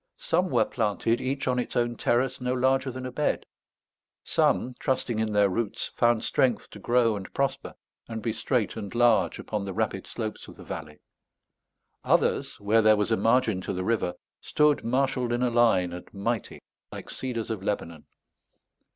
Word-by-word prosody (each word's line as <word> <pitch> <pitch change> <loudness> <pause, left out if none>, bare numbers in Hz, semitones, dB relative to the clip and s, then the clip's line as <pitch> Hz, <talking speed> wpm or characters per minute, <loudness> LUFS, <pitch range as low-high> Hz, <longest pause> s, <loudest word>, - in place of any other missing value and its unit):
Some 180 +3 0
were - - +3
planted, 115 0 0
each 135 +1 -2
on 125 -1 +1
its 125 - -4
own 120 0 +1
terrace 125 +3 0
no 125 0 0
larger 130 +1 +2
than 130 0 -6
a 125 - -4
bed; 150 +4 -1 0.8
some, 125 - +1
trusting 125 -4 -1
in 110 -1 0
their 105 -1 +4
roots, 105 +2 -2
found 120 -2 +2
strength 125 -4 +1
to 105 - -10
grow 120 0 +2
and 95 -2 -7
prosper 135 0 -1 0.3
and 115 -1 -5
be 110 0 -2
straight 115 -1 -1
and 100 +3 -6
large 115 -7 +3
upon 105 -2 -4
the 100 -1 -5
rapid - - -2
slopes 110 -1 -5
of - - -12
the - - -12
valley; 75 -1 -8 1.0
others, - - +1
where 105 +3 +3
there 110 0 +5
was 105 +2 0
a - - +5
margin 115 -4 +2
to - - -4
the 90 0 -3
river, 95 -4 0 0.2
stood 150 -1 +2
marshaled 130 0 0
in 120 +1 0
a 125 - +1
line 110 -7 +3
and 90 - -9
mighty 110 +3 -3 0.3
like - - -8
cedars 115 -4 -4
of 110 -4 -3
Lebanon. 85 -6 -4
115 Hz, 175 wpm, -27 LUFS, 105-125 Hz, 1.0 s, there